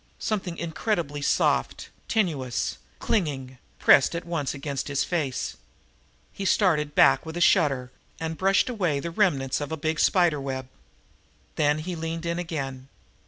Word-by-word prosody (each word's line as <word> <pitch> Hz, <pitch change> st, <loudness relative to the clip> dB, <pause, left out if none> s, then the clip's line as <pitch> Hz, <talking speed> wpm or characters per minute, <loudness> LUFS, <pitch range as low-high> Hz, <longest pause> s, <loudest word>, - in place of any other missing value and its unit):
Something 190 Hz, -6 st, -3 dB
incredibly 165 Hz, -3 st, -2 dB
soft, -, -, +1 dB, 0.2 s
tenuous, 145 Hz, -, -1 dB, 0.2 s
clinging, 135 Hz, -, -2 dB, 0.2 s
pressed 140 Hz, -, +5 dB
at 170 Hz, -, -4 dB
once 165 Hz, -5 st, -2 dB
against 140 Hz, 0 st, -4 dB
his 140 Hz, -1 st, 0 dB
face. 150 Hz, -8 st, -2 dB, 0.8 s
He 195 Hz, -, -6 dB
started 155 Hz, -7 st, +2 dB
back -, -, +5 dB
with 160 Hz, +1 st, -7 dB
a -, -, -1 dB
shudder 140 Hz, -9 st, +3 dB, 0.3 s
and 160 Hz, 0 st, -3 dB
brushed 195 Hz, +4 st, +2 dB
away 180 Hz, -, 0 dB
the 170 Hz, +4 st, -4 dB
remnants 145 Hz, -9 st, +1 dB
of 145 Hz, -, -4 dB
a 160 Hz, -, -2 dB
big 155 Hz, +1 st, -1 dB
spider 175 Hz, -6 st, +3 dB
web. 130 Hz, -1 st, -4 dB, 0.9 s
Then 150 Hz, -1 st, +2 dB
he 175 Hz, +3 st, -4 dB
leaned 165 Hz, +1 st, -4 dB
in 170 Hz, +1 st, -1 dB
again. 135 Hz, -6 st, -5 dB
160 Hz, 145 wpm, -26 LUFS, 140-175 Hz, 0.9 s, pressed